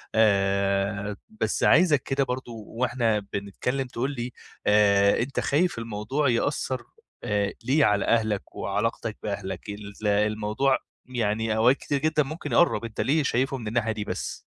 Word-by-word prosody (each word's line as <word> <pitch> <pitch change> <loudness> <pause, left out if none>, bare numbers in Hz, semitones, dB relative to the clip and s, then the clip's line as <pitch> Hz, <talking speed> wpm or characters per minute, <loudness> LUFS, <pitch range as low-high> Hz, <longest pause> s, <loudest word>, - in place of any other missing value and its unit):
آآ، 100 -1 +2
بس 220 - -2
عايزك 160 -5 +5
كده 135 0 0
برضو 125 -4 -5
وإحنا 120 -2 0
بنتكلم 125 +7 -2
تقول 125 +3 -2
لي 125 -2 -4 0.4
آآ، 100 -1 +5
أنتَ 130 +3 -1
خايف 170 +1 +1
الموضوع 115 +6 -1
يأثر 130 +1 0 0.4
آآ، 100 -1 0
ليه 145 +3 +4
على 105 -1 +2
أهلك 110 -3 0
وعلاقتك 105 +2 -2
بأهلك؟ 100 0 -4
ال 105 +1 -6
الموضوع 105 +5 +2 0.3
يعني 110 -3 -1
أوقات 125 +5 +5
كتير 145 - -2
جدًا 155 -1 +2
ممكن 155 +5 -6
يقرب، 170 -8 +3
أنتَ 115 - -4
ليه 150 +2 +2
شايفه 135 +1 0
من 110 -3 -7
الناحية 115 0 0
دي 105 -1 -3
بس؟ - - -4
115 Hz, 145 wpm, -26 LUFS, 105-130 Hz, 0.4 s, عايزك